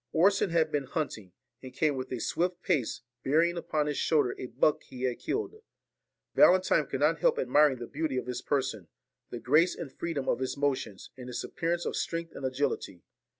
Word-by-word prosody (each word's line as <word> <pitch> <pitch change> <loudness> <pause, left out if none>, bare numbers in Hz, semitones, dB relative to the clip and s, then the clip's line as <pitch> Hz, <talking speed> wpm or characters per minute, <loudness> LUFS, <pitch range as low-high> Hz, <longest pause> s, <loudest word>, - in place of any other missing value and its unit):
Orson 190 +4 +4
had 160 -2 +2
been 145 -2 -1
hunting, 125 - -4 0.3
and 130 - -9
came 145 +2 +1
with 130 -1 -5
a 125 - -2
swift 175 +7 -1
pace, 130 - 0 0.2
bearing 165 +5 +3
upon 155 -3 -1
his 150 -1 -2
shoulders 150 -6 +2
a 130 - -5
buck 135 +5 +2
he 130 0 -9
had 125 -2 -1
killed. 425 +1 -3 0.7
Valentine 185 -5 +5
could 135 - -4
not 155 +2 +3
help - - +3
admiring 140 +1 +4
the 120 - -6
beauty 145 0 -2
of 125 - -2
his 125 -1 -4
person, 130 - -1 0.4
the - - -5
grace 150 +10 +3
and 150 -6 -7
freedom 160 -6 -3
of - - +1
his 130 +1 -3
motions, 135 -8 -2
and 125 -1 -9
his 125 - -4
appearance 170 +1 -2
of - - -2
strength 165 0 -3
and - - -8
agility. 130 -9 -2
145 Hz, 195 wpm, -29 LUFS, 130-165 Hz, 0.7 s, Valentine